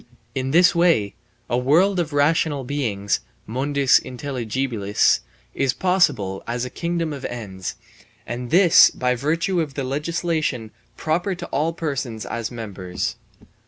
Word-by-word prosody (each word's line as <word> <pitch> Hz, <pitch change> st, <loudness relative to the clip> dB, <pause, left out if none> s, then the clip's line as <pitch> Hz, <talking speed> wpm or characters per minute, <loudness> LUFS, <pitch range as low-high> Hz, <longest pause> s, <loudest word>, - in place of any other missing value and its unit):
In 130 Hz, 0 st, -2 dB
this 175 Hz, +5 st, +5 dB
way 165 Hz, -, +3 dB, 0.3 s
a 120 Hz, -, 0 dB
world 175 Hz, +9 st, +3 dB
of 165 Hz, -2 st, -1 dB
rational 145 Hz, -1 st, +2 dB
beings 110 Hz, -9 st, -1 dB, 0.3 s
(mundus 135 Hz, +3 st, +2 dB
intelligibilis) 125 Hz, -5 st, 0 dB, 0.3 s
is 135 Hz, -2 st, +1 dB
possible 115 Hz, -, +1 dB
as 120 Hz, +1 st, -2 dB
a 125 Hz, -, -7 dB
kingdom 170 Hz, -2 st, -2 dB
of 140 Hz, -2 st, -8 dB
ends, 95 Hz, -6 st, -5 dB, 0.5 s
and 120 Hz, +1 st, -5 dB
this 175 Hz, +1 st, +7 dB
by 125 Hz, 0 st, 0 dB
virtue 165 Hz, +8 st, 0 dB
of 145 Hz, -4 st, -5 dB
the 140 Hz, -, -2 dB
legislation 150 Hz, -4 st, -2 dB, 0.3 s
proper 175 Hz, +5 st, -1 dB
to 175 Hz, 0 st, -7 dB
all 155 Hz, +4 st, 0 dB
persons 140 Hz, -9 st, -4 dB
as 115 Hz, -2 st, -3 dB
members. 100 Hz, -7 st, -4 dB
135 Hz, 130 wpm, -22 LUFS, 120-165 Hz, 0.5 s, this